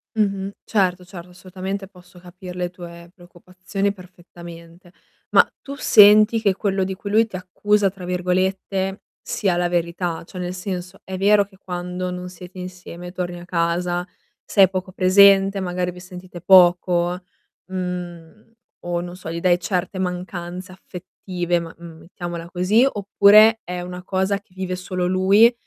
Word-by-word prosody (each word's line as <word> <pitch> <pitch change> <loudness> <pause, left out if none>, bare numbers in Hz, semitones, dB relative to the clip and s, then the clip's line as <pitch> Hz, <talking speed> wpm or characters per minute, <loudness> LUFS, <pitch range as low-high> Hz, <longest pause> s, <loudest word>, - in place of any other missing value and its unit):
Mh-mh, 200 -2 0
certo 185 -4 0
certo, 180 -1 -11
assolutamente, 185 +2 -6
posso 180 -1 -18
capir 180 0 -11
le 180 -1 -2
tue 170 -1 -12
preoccupazioni 185 +2 -5
perfettamente. 175 -2 -14 0.4
Ma - - +5
tu 280 - -8
senti 215 -2 +6
che 200 -3 +2
quello 195 -1 -1
di 190 +1 -3
cui 200 +1 -7
lui 225 +2 +4
ti 190 - -10
"accusa" 200 +3 +1
tra 185 -1 -10
virgolette 190 +2 -1 0.2
sia 190 -4 -1
la 175 0 +1
verità? 170 0 -2
Cioè 180 +1 -8
nel 180 0 -4
senso: 180 0 -6
è 190 0 -6
vero 200 +1 +4
che 195 -1 -22
quando 180 0 -5
non 180 0 -6
siete 180 +1 -12
insieme 180 -1 -9
torni 180 -1 -5
a 175 - -11
casa, 175 +1 -1 0.4
sei 195 -3 +4
poco 185 0 -4
presente, 195 +1 +5
magari 180 -1 -2
vi 180 - -12
sentite 180 -1 -11
poco, 180 -1 +4 0.4
mhmm, 180 +2 -7 0.3
o 175 0 -1
non 175 0 -8
so, 180 -3 -9
gli 170 - -4
dai 175 -1 +3
certe 185 0 -2
mancanze 180 0 -5
affettive, 180 -1 -4
ma 165 -1 -9
mhmm, 170 -1 -11
mettiamola 170 -1 -7
così, 195 +8 +3
oppure 210 +1 +5
è 180 0 -5
una 180 0 -7
cosa 190 +1 -1
che 200 -2 -30
vive 185 -1 -3
solo 180 0 -3
lui 195 +6 +5
180 Hz, 155 wpm, -21 LUFS, 175-195 Hz, 0.4 s, senti